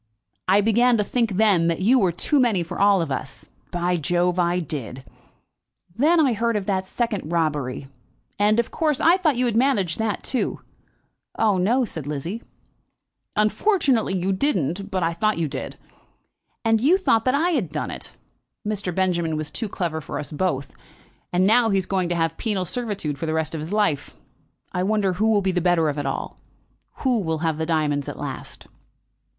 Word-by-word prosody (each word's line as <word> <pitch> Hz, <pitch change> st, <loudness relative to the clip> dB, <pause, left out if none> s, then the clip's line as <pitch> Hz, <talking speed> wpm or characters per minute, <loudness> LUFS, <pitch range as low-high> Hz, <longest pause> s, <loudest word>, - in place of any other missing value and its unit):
I 195 Hz, +3 st, +5 dB
began 235 Hz, +3 st, +3 dB
to 210 Hz, -, +2 dB
think 230 Hz, 0 st, 0 dB
then 190 Hz, -4 st, +3 dB
that 170 Hz, 0 st, 0 dB
you 240 Hz, +8 st, +4 dB
were 190 Hz, -5 st, +2 dB
too 280 Hz, -, +1 dB
many 225 Hz, -9 st, +2 dB
for 165 Hz, -, -7 dB
all 200 Hz, -3 st, +4 dB
of 150 Hz, -, -5 dB
us. 130 Hz, 0 st, -6 dB, 0.2 s
By 175 Hz, 0 st, 0 dB
Jove, 175 Hz, +3 st, 0 dB
I 175 Hz, 0 st, +2 dB
did! 135 Hz, -, -5 dB, 0.9 s
Then 310 Hz, +9 st, +4 dB
I 275 Hz, -6 st, +4 dB
heard 230 Hz, +1 st, 0 dB
of 205 Hz, -2 st, -1 dB
the 190 Hz, -2 st, 0 dB
second 205 Hz, -3 st, -3 dB
robbery, 150 Hz, -5 st, -1 dB, 0.5 s
and, 210 Hz, +2 st, +3 dB
of 235 Hz, -, -1 dB
course, 305 Hz, -4 st, 0 dB
I 340 Hz, +3 st, +5 dB
thought 320 Hz, -7 st, +1 dB
you 250 Hz, -, +2 dB
had 235 Hz, -3 st, 0 dB
managed 225 Hz, -9 st, +1 dB
that 220 Hz, -2 st, -1 dB
too." 255 Hz, -, -1 dB, 0.8 s
"Oh, 210 Hz, -4 st, +2 dB
no," 240 Hz, +8 st, +2 dB
said 160 Hz, -9 st, -6 dB
Lizzie 165 Hz, +10 st, -4 dB, 0.9 s
"Unfortunately 240 Hz, -, +2 dB
you 185 Hz, +2 st, 0 dB
didn't; 190 Hz, -, -1 dB
but 185 Hz, -3 st, -1 dB
I 165 Hz, +1 st, +1 dB
thought 215 Hz, +5 st, 0 dB
you 165 Hz, -2 st, 0 dB
did. 145 Hz, -, -6 dB, 0.9 s
And 225 Hz, -1 st, +3 dB
you 320 Hz, +9 st, +5 dB
thought 230 Hz, -, +2 dB
that 255 Hz, +1 st, +3 dB
I 335 Hz, +5 st, +2 dB
had 225 Hz, -, -1 dB
done 150 Hz, -, -3 dB
it! -, -, -8 dB, 0.6 s
Mr. 200 Hz, -5 st, -2 dB
Benjamin 170 Hz, -4 st, 0 dB
was 155 Hz, -1 st, -3 dB
too 225 Hz, -3 st, -3 dB
clever 165 Hz, -4 st, -3 dB
for -, -, -6 dB
us 150 Hz, -, -5 dB
both, 150 Hz, -4 st, -2 dB, 0.6 s
and 180 Hz, +1 st, +2 dB
now 225 Hz, +3 st, +4 dB
he 195 Hz, -, +2 dB
is 190 Hz, -, 0 dB
going 185 Hz, -3 st, -1 dB
to 175 Hz, -, 0 dB
have 165 Hz, -1 st, -1 dB
penal 205 Hz, -5 st, -1 dB
servitude 200 Hz, -, -3 dB
for 165 Hz, -, -3 dB
the 160 Hz, -, -1 dB
rest 160 Hz, 0 st, -1 dB
of 160 Hz, -, -4 dB
his 160 Hz, +4 st, -6 dB
life. 205 Hz, -9 st, 0 dB, 0.6 s
I 180 Hz, -, -2 dB
wonder 200 Hz, -1 st, +1 dB
who 215 Hz, +5 st, +1 dB
will 205 Hz, -2 st, +3 dB
be 190 Hz, -, +1 dB
the 180 Hz, -1 st, 0 dB
better 170 Hz, -3 st, +3 dB
of 145 Hz, 0 st, -3 dB
it 145 Hz, -, -2 dB
all. 135 Hz, -, -4 dB, 0.6 s
Who'll 210 Hz, -, +1 dB
have 160 Hz, -1 st, -1 dB
the 160 Hz, -, -2 dB
diamonds 150 Hz, -4 st, 0 dB
at -, -, -7 dB
last?" -, -, -7 dB
190 Hz, 190 wpm, -23 LUFS, 165-225 Hz, 0.9 s, I